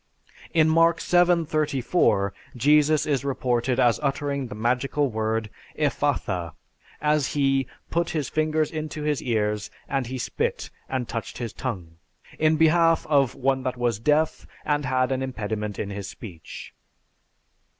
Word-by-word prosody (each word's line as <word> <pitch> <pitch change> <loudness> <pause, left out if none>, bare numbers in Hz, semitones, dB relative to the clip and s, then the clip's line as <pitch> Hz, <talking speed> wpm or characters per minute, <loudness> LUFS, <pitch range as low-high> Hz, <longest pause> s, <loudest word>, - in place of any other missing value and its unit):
In 160 -2 +4
Mark 165 +1 +4
VII:34, 155 - +2 0.3
Jesus 150 +4 +4
is 140 -4 0
reported 125 -2 0
as 120 -2 +4
uttering 140 -1 -1
the 105 - -8
magical 125 +5 0
word 110 0 -1 0.3
"Ephphatha," 85 -3 -1 0.5
as 150 -2 +1
he 135 -2 +2 0.2
"put 170 0 0
his 150 -5 -2
fingers 155 -1 0
into 155 -1 -5
his 150 -2 0
ears, 105 -3 -1 0.2
and 135 -3 -1
he 130 +2 -4
spit, 125 - -2 0.2
and 130 -3 -2
touched 115 -2 -5
his 115 -4 -5
tongue" 90 -10 -5 0.4
in 155 0 +4
behalf 165 +1 +4
of 140 -4 +3
"one 135 0 +1
that 130 -1 -3
was 120 -4 0
deaf, 150 +6 +1 0.2
and 145 -1 0
had 130 0 +1
an 130 0 0
impediment 105 -5 -3
in 100 - -4
his 100 -1 -5
speech." 90 -8 -10
135 Hz, 140 wpm, -25 LUFS, 115-150 Hz, 0.5 s, In